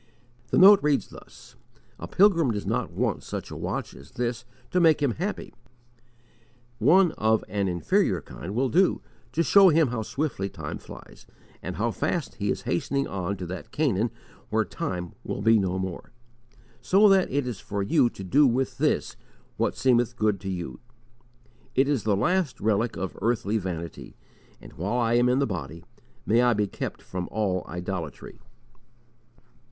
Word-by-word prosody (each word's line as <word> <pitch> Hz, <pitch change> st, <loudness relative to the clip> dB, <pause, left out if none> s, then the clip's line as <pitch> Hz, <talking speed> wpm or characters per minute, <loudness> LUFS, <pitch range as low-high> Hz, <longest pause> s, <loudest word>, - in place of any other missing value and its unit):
The -, -, +1 dB
note 200 Hz, +2 st, +8 dB
reads 145 Hz, -2 st, +1 dB
thus: -, -, -15 dB, 0.4 s
"A -, -, -6 dB
pilgrim 180 Hz, -8 st, +4 dB
does 105 Hz, -3 st, -2 dB
not -, -, -1 dB
want -, -, -1 dB
such -, -, -6 dB
a -, -, -6 dB
watch -, -, -4 dB
as 70 Hz, -, -14 dB
this 120 Hz, -1 st, -3 dB, 0.3 s
to 180 Hz, -, +2 dB
make 160 Hz, -3 st, +5 dB
him 140 Hz, -4 st, +1 dB
happy; 185 Hz, -, -4 dB, 1.3 s
one 175 Hz, -, +5 dB
of 110 Hz, 0 st, +2 dB
an 100 Hz, 0 st, -1 dB
inferior 85 Hz, -3 st, +1 dB
kind 65 Hz, -, -8 dB
will 130 Hz, +2 st, +1 dB
do 185 Hz, +6 st, +2 dB, 0.3 s
to 165 Hz, -, +2 dB
show 195 Hz, +2 st, +7 dB
him 160 Hz, -4 st, +3 dB
how 120 Hz, -2 st, -2 dB
swiftly 120 Hz, -5 st, -3 dB
time -, -, -7 dB
flies, -, -, -13 dB, 0.3 s
and -, -, -5 dB
how -, -, 0 dB
fast -, -, -2 dB
he -, -, -1 dB
is -, -, -2 dB
hastening 140 Hz, +10 st, -1 dB
on 100 Hz, +1 st, -3 dB
to 90 Hz, -, -6 dB
that 90 Hz, +1 st, -7 dB
Canaan 120 Hz, -7 st, +1 dB, 0.4 s
where -, -, +1 dB
time 90 Hz, -1 st, -5 dB
will 100 Hz, -, -4 dB
be 110 Hz, 0 st, +5 dB
no 95 Hz, -1 st, -1 dB
more: 95 Hz, -2 st, -5 dB, 0.7 s
so 200 Hz, +3 st, +5 dB
that 195 Hz, -2 st, +4 dB
it 140 Hz, 0 st, 0 dB
is 120 Hz, -7 st, -5 dB
for 100 Hz, -1 st, -3 dB
you 130 Hz, +3 st, +3 dB
to 100 Hz, -, -10 dB
do 140 Hz, +10 st, +4 dB
with 130 Hz, +2 st, -1 dB
this -, -, 0 dB, 0.4 s
what -, -, 0 dB
it -, -, -17 dB
seemeth 120 Hz, -2 st, +2 dB
good 105 Hz, -4 st, +1 dB
to 95 Hz, -, -5 dB
you. 90 Hz, -2 st, -5 dB, 1.0 s
It 135 Hz, +1 st, +3 dB
is 140 Hz, -6 st, 0 dB
the 105 Hz, -3 st, +2 dB
last 170 Hz, -, 0 dB
relic 110 Hz, +2 st, 0 dB
of 95 Hz, 0 st, -4 dB
earthly 110 Hz, -1 st, 0 dB
vanity, 85 Hz, -4 st, -6 dB, 0.4 s
and, -, -, -14 dB
while 100 Hz, +10 st, -2 dB
I 115 Hz, -1 st, +1 dB
am 120 Hz, +1 st, +4 dB
in 125 Hz, -, +2 dB
the 140 Hz, -, +2 dB
body, 85 Hz, -, -6 dB, 0.4 s
may 115 Hz, +3 st, +3 dB
I 125 Hz, -1 st, +4 dB
be 105 Hz, -1 st, +1 dB
kept 100 Hz, -, -6 dB
from 90 Hz, -1 st, -5 dB
all 95 Hz, -3 st, -1 dB
idolatry!" 90 Hz, -4 st, -6 dB
115 Hz, 175 wpm, -26 LUFS, 95-140 Hz, 1.3 s, note